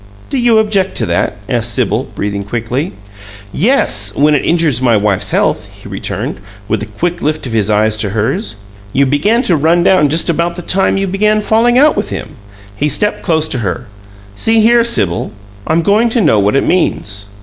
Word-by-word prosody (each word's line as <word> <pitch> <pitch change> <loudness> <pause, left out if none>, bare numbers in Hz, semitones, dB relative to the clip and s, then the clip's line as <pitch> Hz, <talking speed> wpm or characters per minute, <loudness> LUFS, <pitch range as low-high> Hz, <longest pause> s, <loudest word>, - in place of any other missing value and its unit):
"Do 275 - 0
you 240 -2 +3
object 205 -3 +1
to - - -1
that?" 105 - -1
asked 120 -1 -1
Sibyl, - - 0
breathing 100 0 -3
quickly. 120 - -3 0.6
"Yes 125 - +1
when 150 +2 +3
it 145 - +1
injures 160 -7 +1
my 120 -4 +3
wife's 100 -2 0
health!" - - 0
he - - -12
returned, - - -4 0.3
with 110 -1 -1
a 105 - -5
quick 175 +12 -3
lift 155 0 -2
of 120 - -5
his 105 -2 +1
eyes 105 +1 +2
to 105 -2 -2
hers. 110 - -2 0.4
"You 140 - +3
began 180 - +1
to 180 - +2
run 165 +3 +2
down 180 -6 +4
just 160 +3 0
about 170 +1 0
the 175 - -7
time 195 +2 +1
you 195 - 0
began 210 +3 +1
falling 230 +3 +2
out 300 +3 +5
with 205 - -2
him." - - -5 0.5
He 150 +7 -1
stepped 210 +9 +1
close 160 -3 0
to 130 - -2
her. 110 +3 -3 0.5
"See 225 - +2
here, 235 +2 +4
Sibyl, 105 - -1 0.3
I'm 165 +1 +1
going 215 +5 +3
to 235 - 0
know 130 - +3
what 100 +3 +1
it 135 - +2
means." 100 - -1
155 Hz, 195 wpm, -13 LUFS, -, 0.6 s, out